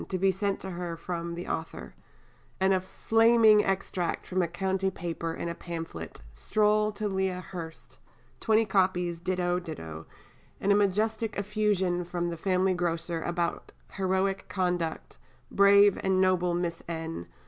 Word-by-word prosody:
to 185 Hz, -, -1 dB
be 190 Hz, +1 st, +3 dB
sent 195 Hz, +1 st, -1 dB
to 190 Hz, -, -6 dB
her 175 Hz, -1 st, -5 dB
"from 170 Hz, 0 st, -4 dB
the 175 Hz, -, -6 dB
author," 160 Hz, 0 st, -5 dB, 0.7 s
and 190 Hz, 0 st, +3 dB
a 185 Hz, -, +2 dB
flaming 225 Hz, +2 st, +4 dB
extract 190 Hz, -2 st, -2 dB
from 185 Hz, 0 st, 0 dB
a 175 Hz, -, +1 dB
County 190 Hz, +2 st, -1 dB
paper 170 Hz, -2 st, -4 dB
in -, -, -4 dB
a 170 Hz, -, -2 dB
pamphlet, 165 Hz, -, -7 dB
Stroll 210 Hz, -, +1 dB
to 210 Hz, +1 st, -3 dB
Lea 190 Hz, -2 st, -1 dB
Hurst, 170 Hz, -2 st, -9 dB, 0.4 s
20 220 Hz, 0 st, +3 dB
copies 185 Hz, -3 st, +1 dB
ditto, 180 Hz, 0 st, 0 dB
ditto, 80 Hz, -, -8 dB, 0.5 s
and 200 Hz, -, +1 dB
a -, -, +6 dB
majestic 210 Hz, +2 st, +1 dB
effusion 200 Hz, -4 st, 0 dB
from 175 Hz, 0 st, -3 dB
the 170 Hz, -, -5 dB
family 185 Hz, +2 st, +1 dB
grocer 170 Hz, -1 st, -2 dB
about 175 Hz, 0 st, -2 dB, 0.2 s
"heroic 190 Hz, 0 st, -1 dB
conduct," 180 Hz, -4 st, -2 dB, 0.3 s
"brave 200 Hz, 0 st, +6 dB
and 190 Hz, -1 st, +2 dB
noble 180 Hz, -2 st, +2 dB
Miss 175 Hz, -1 st, -2 dB
N. 160 Hz, -, -5 dB
185 Hz, 150 wpm, -28 LUFS, 170-195 Hz, 0.7 s, a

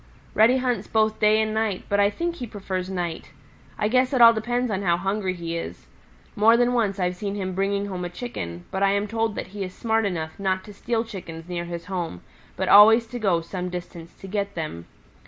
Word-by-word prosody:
"Reddy 230 Hz, +4 st, +5 dB
hunts 250 Hz, -2 st, -1 dB
both 220 Hz, -1 st, +1 dB
day 215 Hz, 0 st, +4 dB
and 220 Hz, 0 st, 0 dB
night, 220 Hz, -3 st, -1 dB
but 200 Hz, -, +1 dB
I 200 Hz, 0 st, +5 dB
think 340 Hz, +10 st, -3 dB
he 245 Hz, -, -5 dB
prefers 190 Hz, -3 st, -4 dB
night. 175 Hz, -3 st, -4 dB, 0.5 s
I 210 Hz, -, +1 dB
guess 255 Hz, +4 st, +2 dB
it 260 Hz, -, +2 dB
all 230 Hz, -1 st, +9 dB
depends 240 Hz, +2 st, -1 dB
on 195 Hz, -1 st, -1 dB
how 170 Hz, -3 st, +2 dB
hungry 195 Hz, 0 st, -1 dB
he 170 Hz, -1 st, -4 dB
is. 85 Hz, -, -6 dB, 0.5 s
More 225 Hz, +3 st, +5 dB
than 245 Hz, +1 st, +2 dB
once 210 Hz, -5 st, 0 dB
I've 180 Hz, 0 st, 0 dB
seen 200 Hz, +2 st, -4 dB
him 190 Hz, -2 st, -3 dB
bringing 200 Hz, +2 st, 0 dB
home 185 Hz, -3 st, -5 dB
a 175 Hz, -, -3 dB
Chicken, 90 Hz, -, -6 dB
but 190 Hz, -, -3 dB
I 195 Hz, 0 st, +4 dB
am 200 Hz, +1 st, 0 dB
told 225 Hz, 0 st, -1 dB
that -, -, -5 dB
he 200 Hz, +1 st, -5 dB
is 185 Hz, -1 st, -7 dB
smart 225 Hz, -2 st, 0 dB
enough 160 Hz, -4 st, -4 dB
not 190 Hz, -1 st, 0 dB
to 210 Hz, -, -11 dB
steal 230 Hz, +3 st, -1 dB
Chickens 170 Hz, -7 st, -9 dB
near 175 Hz, -1 st, -4 dB
his 170 Hz, 0 st, -6 dB
home, 175 Hz, -, -4 dB, 0.4 s
but -, -, -1 dB
always 225 Hz, +3 st, +8 dB
to 245 Hz, +2 st, -7 dB
go 190 Hz, -6 st, +2 dB
some 180 Hz, +2 st, -5 dB
distance 175 Hz, -1 st, -8 dB
to -, -, -12 dB
get 200 Hz, 0 st, -3 dB
them. 155 Hz, -, -5 dB
200 Hz, 225 wpm, -24 LUFS, 180-220 Hz, 0.5 s, all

